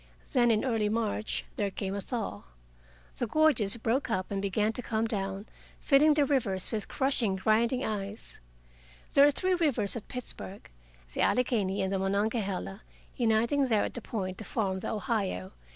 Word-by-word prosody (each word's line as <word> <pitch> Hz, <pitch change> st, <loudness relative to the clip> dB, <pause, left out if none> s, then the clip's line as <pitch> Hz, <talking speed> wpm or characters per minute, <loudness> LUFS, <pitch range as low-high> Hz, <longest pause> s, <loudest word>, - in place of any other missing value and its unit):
Then, 245 Hz, -3 st, +4 dB
in 225 Hz, +2 st, +2 dB
early 225 Hz, -5 st, +1 dB
March, 215 Hz, -1 st, -1 dB
there 205 Hz, -1 st, 0 dB
came 195 Hz, 0 st, -4 dB
a 200 Hz, -, -3 dB
thaw. 210 Hz, -, -4 dB, 0.8 s
The 240 Hz, -, 0 dB
gorges 240 Hz, -7 st, +3 dB
broke 235 Hz, +4 st, 0 dB
up 185 Hz, -3 st, -2 dB
and 195 Hz, -1 st, -1 dB
began 210 Hz, +2 st, 0 dB
to 250 Hz, -, -3 dB
come 225 Hz, -1 st, -1 dB
down, 195 Hz, -2 st, -3 dB, 0.3 s
filling 295 Hz, +1 st, +5 dB
the 295 Hz, -2 st, +4 dB
rivers 225 Hz, -10 st, 0 dB
with 215 Hz, -3 st, -3 dB
crushing 265 Hz, -7 st, +1 dB
grinding 230 Hz, +6 st, +2 dB
ice. 205 Hz, 0 st, -4 dB, 0.7 s
There 280 Hz, +1 st, +7 dB
are -, -, +6 dB
three 370 Hz, +6 st, +1 dB
rivers 295 Hz, -, +2 dB
at 230 Hz, -, -6 dB
Pittsburgh, 230 Hz, -5 st, -6 dB, 0.5 s
the -, -, -1 dB
Allegheny 215 Hz, -7 st, +1 dB
and 190 Hz, +1 st, -1 dB
the 195 Hz, -, 0 dB
Monongahela 200 Hz, 0 st, -1 dB, 0.3 s
uniting 235 Hz, +4 st, +2 dB
there 220 Hz, -4 st, +2 dB
at -, -, -3 dB
the 240 Hz, -, -5 dB
Point 190 Hz, -5 st, -4 dB
to -, -, -5 dB
form 195 Hz, -4 st, -1 dB
the -, -, -4 dB
Ohio. 205 Hz, -, -2 dB
220 Hz, 170 wpm, -29 LUFS, 195-250 Hz, 0.8 s, There